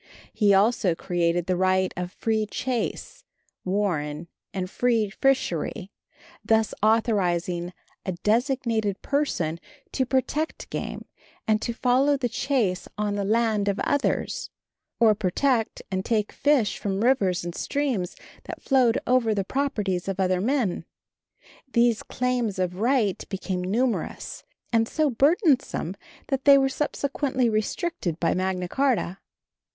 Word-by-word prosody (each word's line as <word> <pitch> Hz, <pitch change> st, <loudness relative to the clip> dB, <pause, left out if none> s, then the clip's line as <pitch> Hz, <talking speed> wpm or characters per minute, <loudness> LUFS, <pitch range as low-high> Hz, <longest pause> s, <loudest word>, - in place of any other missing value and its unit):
He 205 Hz, -2 st, +3 dB
also 200 Hz, -2 st, +3 dB
created 175 Hz, -1 st, 0 dB
the 185 Hz, -, 0 dB
right 185 Hz, 0 st, +2 dB
of 180 Hz, 0 st, -4 dB
free 220 Hz, 0 st, -1 dB
chase, 260 Hz, -, -3 dB, 0.4 s
warren 170 Hz, -5 st, -1 dB, 0.2 s
and 185 Hz, -1 st, -3 dB
free 225 Hz, 0 st, +1 dB
fishery, 200 Hz, -, 0 dB, 0.5 s
thus 220 Hz, -1 st, +2 dB
authorizing 180 Hz, -6 st, +1 dB, 0.3 s
a 185 Hz, -, -2 dB
designated 225 Hz, 0 st, 0 dB
person 180 Hz, -, -1 dB, 0.3 s
to 260 Hz, -2 st, 0 dB
protect 275 Hz, +4 st, -1 dB
game -, -, -5 dB, 0.4 s
and 215 Hz, 0 st, +2 dB
to -, -, -2 dB
follow 260 Hz, +4 st, +2 dB
the 250 Hz, -3 st, -1 dB
chase 235 Hz, -7 st, 0 dB
on 210 Hz, -1 st, -1 dB
the 205 Hz, 0 st, -1 dB
land 215 Hz, -1 st, +1 dB
of 200 Hz, +1 st, 0 dB
others, 285 Hz, -1 st, 0 dB, 0.5 s
or 225 Hz, -2 st, +6 dB
protect 220 Hz, +4 st, 0 dB
and 190 Hz, 0 st, -1 dB
take 215 Hz, -2 st, 0 dB
fish 280 Hz, -8 st, +2 dB
from 195 Hz, -1 st, -2 dB
rivers 195 Hz, -9 st, +2 dB
and 175 Hz, -, -4 dB
streams 255 Hz, -11 st, -2 dB, 0.3 s
that -, -, -7 dB
flowed 255 Hz, -4 st, +3 dB
over 245 Hz, -4 st, +2 dB
the 200 Hz, -, 0 dB
properties 210 Hz, -10 st, -1 dB
of 195 Hz, -1 st, -3 dB
other 185 Hz, -1 st, +2 dB
men. 240 Hz, -4 st, 0 dB, 0.9 s
These 235 Hz, -2 st, +3 dB
claims 245 Hz, -5 st, -1 dB
of 180 Hz, 0 st, -2 dB
right 230 Hz, -4 st, +1 dB
became 185 Hz, -2 st, -3 dB
numerous 230 Hz, +6 st, -2 dB, 0.3 s
and 225 Hz, -1 st, +3 dB
so 305 Hz, +1 st, +1 dB
burdensome 275 Hz, -, +2 dB, 0.3 s
that 270 Hz, -2 st, -1 dB
they 280 Hz, -1 st, +9 dB
were 270 Hz, 0 st, +3 dB
subsequently 275 Hz, -2 st, -1 dB
restricted 215 Hz, -, -2 dB
by 165 Hz, -, +2 dB
Magna 185 Hz, -1 st, -1 dB
Charta. 245 Hz, -6 st, 0 dB
215 Hz, 130 wpm, -25 LUFS, 185-255 Hz, 0.9 s, they